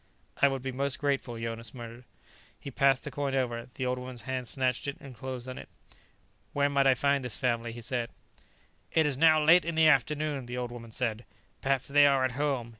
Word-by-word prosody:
"I 140 Hz, -, +7 dB
would 135 Hz, -2 st, -2 dB
be 135 Hz, -, -3 dB
most 140 Hz, +2 st, -1 dB
grateful," 135 Hz, -5 st, -1 dB
Jonas 115 Hz, +1 st, -5 dB
murmured. 120 Hz, 0 st, -9 dB, 0.5 s
He 140 Hz, -, -8 dB
passed 135 Hz, 0 st, +3 dB
the -, -, -6 dB
coin 140 Hz, -2 st, -2 dB
over; 120 Hz, -2 st, -1 dB
the 130 Hz, +1 st, -5 dB
old 125 Hz, 0 st, -1 dB
woman's 125 Hz, -1 st, -8 dB
hand 130 Hz, -2 st, -3 dB
snatched 130 Hz, +1 st, -1 dB
it 140 Hz, -, -3 dB
and 135 Hz, -2 st, -11 dB
closed 130 Hz, +1 st, -6 dB
on 130 Hz, -, -6 dB
it. -, -, -11 dB, 0.8 s
"Where 145 Hz, 0 st, +2 dB
might 140 Hz, -1 st, +3 dB
I 130 Hz, -, +5 dB
find 140 Hz, +1 st, +1 dB
this 125 Hz, -4 st, -2 dB
family?" 115 Hz, -2 st, -1 dB
he 120 Hz, +1 st, -9 dB
said. 120 Hz, 0 st, -2 dB, 0.8 s
"It 160 Hz, -, +3 dB
is 145 Hz, -2 st, 0 dB
now 155 Hz, +2 st, +5 dB
late 170 Hz, +4 st, +6 dB
in 170 Hz, 0 st, -3 dB
the 160 Hz, 0 st, +5 dB
afternoon," 150 Hz, -1 st, +1 dB
the 125 Hz, +1 st, -5 dB
old 125 Hz, -1 st, -3 dB
woman 115 Hz, -1 st, -9 dB
said. 115 Hz, -1 st, -1 dB, 0.4 s
"Perhaps 135 Hz, -1 st, 0 dB
they 145 Hz, +1 st, +6 dB
are 135 Hz, -2 st, +3 dB
at 130 Hz, -, -1 dB
home. 135 Hz, -3 st, -1 dB
130 Hz, 215 wpm, -29 LUFS, 120-140 Hz, 0.8 s, I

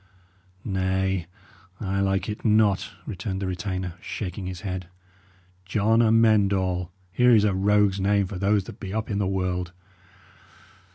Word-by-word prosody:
"Nay, 95 Hz, -2 st, 0 dB, 0.5 s
I 100 Hz, -1 st, -2 dB
like 95 Hz, 0 st, 0 dB
it 105 Hz, -1 st, -5 dB
not," 105 Hz, -3 st, +3 dB, 0.2 s
returned 95 Hz, +1 st, -4 dB
the 95 Hz, -, -3 dB
retainer, 90 Hz, -1 st, -3 dB
shaking 95 Hz, -1 st, -5 dB
his 90 Hz, -1 st, -6 dB
head. 90 Hz, -3 st, -4 dB, 0.8 s
"John 105 Hz, +4 st, +2 dB
Amend 110 Hz, -3 st, +4 dB
All! 90 Hz, -2 st, -1 dB, 0.2 s
Here 125 Hz, +4 st, +5 dB
is 105 Hz, -, +5 dB
a 105 Hz, -2 st, +2 dB
rogue's 100 Hz, 0 st, +2 dB
name 100 Hz, +1 st, +2 dB
for 90 Hz, 0 st, -6 dB
those 100 Hz, +1 st, +2 dB
that -, -, -11 dB
be 95 Hz, -, -6 dB
up 110 Hz, 0 st, -2 dB
in 100 Hz, -, -1 dB
the 100 Hz, -, +1 dB
world! 90 Hz, -1 st, -2 dB
95 Hz, 150 wpm, -25 LUFS, 95-105 Hz, 0.8 s, Here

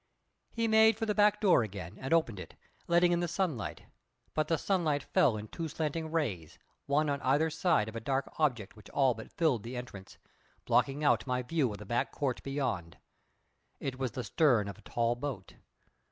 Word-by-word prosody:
He 230 Hz, -1 st, -1 dB
made 220 Hz, 0 st, +5 dB
for 225 Hz, -, -1 dB
the 210 Hz, -, 0 dB
back 210 Hz, 0 st, +4 dB
door 195 Hz, -, +5 dB
again, 95 Hz, -5 st, -6 dB
and 135 Hz, -, -5 dB
opened 160 Hz, -, +2 dB
it, -, -, -10 dB, 0.3 s
letting 175 Hz, +1 st, +4 dB
in 175 Hz, -, +2 dB
the 175 Hz, -, 0 dB
sunlight; 165 Hz, -, -2 dB, 0.5 s
but 155 Hz, -1 st, 0 dB
the 165 Hz, -, +1 dB
sunlight 155 Hz, -6 st, 0 dB
fell 145 Hz, -, +2 dB
in 105 Hz, +1 st, -7 dB
two 165 Hz, +8 st, -5 dB
slanting 160 Hz, +1 st, -3 dB
rays, 95 Hz, -, -2 dB, 0.3 s
one 150 Hz, +2 st, +2 dB
on 140 Hz, -1 st, -1 dB
either 145 Hz, +5 st, +2 dB
side 160 Hz, -, +2 dB
of 110 Hz, -, -8 dB
a -, -, -2 dB
dark 135 Hz, +4 st, -1 dB
object 125 Hz, -10 st, 0 dB
which 105 Hz, -2 st, -15 dB
all 135 Hz, -3 st, +3 dB
but 110 Hz, -1 st, -10 dB
filled 150 Hz, -10 st, +1 dB
the 120 Hz, +4 st, -6 dB
entrance, 105 Hz, -6 st, -9 dB, 0.5 s
blocking 140 Hz, +2 st, +2 dB
out 145 Hz, -, +3 dB
my 125 Hz, 0 st, 0 dB
view 135 Hz, -2 st, 0 dB
of 105 Hz, -, -6 dB
the 105 Hz, -, -10 dB
back 120 Hz, +4 st, -1 dB
court 135 Hz, -4 st, -2 dB
beyond. 130 Hz, -, -3 dB, 0.8 s
It 130 Hz, -1 st, -4 dB
was 130 Hz, -4 st, -2 dB
the 125 Hz, -, -4 dB
stern 115 Hz, -2 st, +3 dB
of 100 Hz, -, -8 dB
a -, -, -15 dB
tall 120 Hz, 0 st, +1 dB
boat. 120 Hz, -7 st, -6 dB
140 Hz, 195 wpm, -31 LUFS, 115-165 Hz, 0.8 s, made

